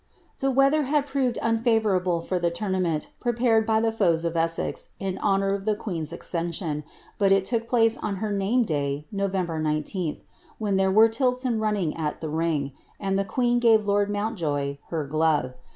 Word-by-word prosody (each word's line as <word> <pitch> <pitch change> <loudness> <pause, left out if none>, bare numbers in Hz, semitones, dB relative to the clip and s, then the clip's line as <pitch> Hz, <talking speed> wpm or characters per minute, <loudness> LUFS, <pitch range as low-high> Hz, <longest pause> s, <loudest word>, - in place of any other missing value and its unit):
The 270 - +1
weather 275 +3 +3
had 290 +1 +1
proved 265 -4 -1
unfavourable 220 -7 +1
for 180 +2 -2
the 175 0 +1
tournament, 180 -4 -1
prepared 235 -2 +2
ff 220 0 +2
the 225 - +2
foes 170 -6 +1
of 170 0 -2
Essex 165 0 -2
in 190 -2 -3
honour 195 -1 +1
of 200 -1 -3
the 215 -1 +2
queen's 170 -7 -4
accession, 170 -3 -3 0.4
but 200 -1 +3
it 195 -1 +4
took 230 +1 -1
ilace 225 -1 +3
on 210 -2 -2
her 210 +2 -3
name 205 +5 +2
day, 145 -5 -2
Nov. 200 -1 -1
19th, 160 -2 -2 0.4
when 205 -3 0
there 190 0 +3
were 215 +4 +6
tilts 250 +3 0
and 230 -3 0
running 205 -7 0
il 150 -2 -2
the 160 - -4
ring, 155 -3 -1 0.3
and 195 -1 -1
the 195 - +1
queen 240 +4 +1
gave 225 -3 +4
lord 205 0 +2
Mountjoye 160 -10 -2
her 160 -3 -2
dove. 150 -3 +1
195 Hz, 180 wpm, -25 LUFS, 165-225 Hz, 0.4 s, were